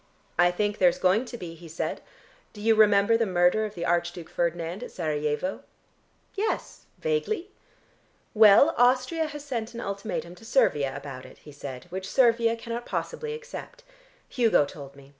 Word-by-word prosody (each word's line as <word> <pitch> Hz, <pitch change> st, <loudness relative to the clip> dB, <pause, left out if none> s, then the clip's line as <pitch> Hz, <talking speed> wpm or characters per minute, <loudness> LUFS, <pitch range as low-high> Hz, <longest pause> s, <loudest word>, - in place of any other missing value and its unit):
"I 175 Hz, 0 st, +6 dB
think 205 Hz, +4 st, -1 dB
there's 180 Hz, -1 st, +4 dB
going 190 Hz, +7 st, +2 dB
to 240 Hz, -, -8 dB
be," 175 Hz, -6 st, -7 dB
he 165 Hz, +1 st, -13 dB
said. 160 Hz, -, -4 dB, 0.5 s
"Do 210 Hz, -, -10 dB
you 225 Hz, +1 st, +4 dB
remember 210 Hz, 0 st, +5 dB
the 230 Hz, -1 st, +1 dB
murder 180 Hz, +4 st, +3 dB
of 210 Hz, 0 st, -7 dB
the 170 Hz, -, -4 dB
Archduke 175 Hz, -1 st, -1 dB
Ferdinand 170 Hz, +3 st, -2 dB
at 245 Hz, -, -6 dB
Serajevo?" 150 Hz, +2 st, -2 dB, 0.7 s
"Yes, 430 Hz, +2 st, -3 dB
vaguely." 440 Hz, -5 st, -2 dB, 0.8 s
"Well, 220 Hz, +8 st, +7 dB
Austria 255 Hz, +6 st, +3 dB
has 295 Hz, -1 st, -8 dB
sent 235 Hz, -4 st, -4 dB
an -, -, -5 dB
ultimatum 200 Hz, -4 st, -4 dB
to 180 Hz, -, -16 dB
Servia 145 Hz, -, +2 dB
about 135 Hz, -3 st, -8 dB
it," -, -, -16 dB
he 150 Hz, -, -14 dB
said, 140 Hz, -2 st, -8 dB
"which 190 Hz, +1 st, -5 dB
Servia 230 Hz, -2 st, +3 dB
cannot 235 Hz, +1 st, -6 dB
possibly 460 Hz, -2 st, -4 dB
accept. -, -, -9 dB, 0.4 s
Hugo 230 Hz, -, +3 dB
told 140 Hz, -1 st, -11 dB
me. 140 Hz, 0 st, -16 dB
205 Hz, 160 wpm, -26 LUFS, 170-240 Hz, 0.8 s, Well